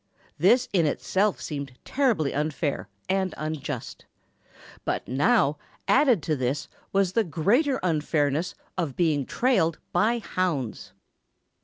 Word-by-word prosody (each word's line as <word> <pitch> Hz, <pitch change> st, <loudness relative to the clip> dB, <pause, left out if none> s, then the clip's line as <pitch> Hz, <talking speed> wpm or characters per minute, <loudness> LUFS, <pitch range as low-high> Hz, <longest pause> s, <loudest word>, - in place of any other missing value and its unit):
This 240 Hz, -, +4 dB
in 170 Hz, -5 st, +3 dB
itself 195 Hz, +7 st, 0 dB
seemed 140 Hz, -3 st, -5 dB
terribly 235 Hz, -, +1 dB
unfair 145 Hz, -, -2 dB, 0.2 s
and 190 Hz, -1 st, 0 dB
unjust. 155 Hz, -1 st, -5 dB, 0.8 s
But -, -, -2 dB
now, 150 Hz, -, +2 dB, 0.3 s
added 255 Hz, -, +4 dB
to 155 Hz, +1 st, 0 dB
this 130 Hz, +1 st, -2 dB, 0.2 s
was 195 Hz, -2 st, +2 dB
the 230 Hz, -, +3 dB
greater 215 Hz, -, +2 dB
unfairness 155 Hz, -1 st, 0 dB, 0.2 s
of 160 Hz, -7 st, -2 dB
being 155 Hz, -6 st, +1 dB
trailed 200 Hz, -11 st, +2 dB
by 230 Hz, +3 st, +2 dB
hounds. 145 Hz, -, -2 dB
165 Hz, 115 wpm, -26 LUFS, 145-205 Hz, 0.8 s, This